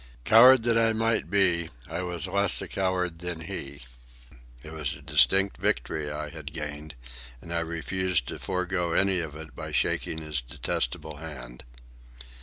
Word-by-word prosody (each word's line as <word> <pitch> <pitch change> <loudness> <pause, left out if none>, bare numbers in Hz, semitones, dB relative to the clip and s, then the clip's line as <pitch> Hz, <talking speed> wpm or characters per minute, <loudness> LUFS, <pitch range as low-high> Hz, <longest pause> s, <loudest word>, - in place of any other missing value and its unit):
Coward 125 +2 +8
that 115 -1 +3
I 115 0 +3
might 115 0 0
be, 90 -5 +2 0.2
I 85 +2 -4
was 90 0 -1
less 100 +1 +2
a - - -4
coward 90 -3 -1
than 90 -2 -5
he. 70 -6 -6 0.8
It 75 - -9
was 75 -4 -3
a 70 - -13
distinct 80 +7 +3
victory 75 +5 -1
I 75 0 -4
had 75 -3 -8
gained, 75 -1 -6 0.4
and 85 +7 -8
I 85 - +1
refused 85 -2 -1
to - - -6
forego 90 -2 -1
any 95 0 +3
of 80 -3 -5
it 75 -1 -10
by - - -6
shaking 80 - 0
his 75 -3 -3
detestable 60 +4 -3
hand. 65 -6 -8
85 Hz, 160 wpm, -27 LUFS, 75-95 Hz, 0.8 s, Coward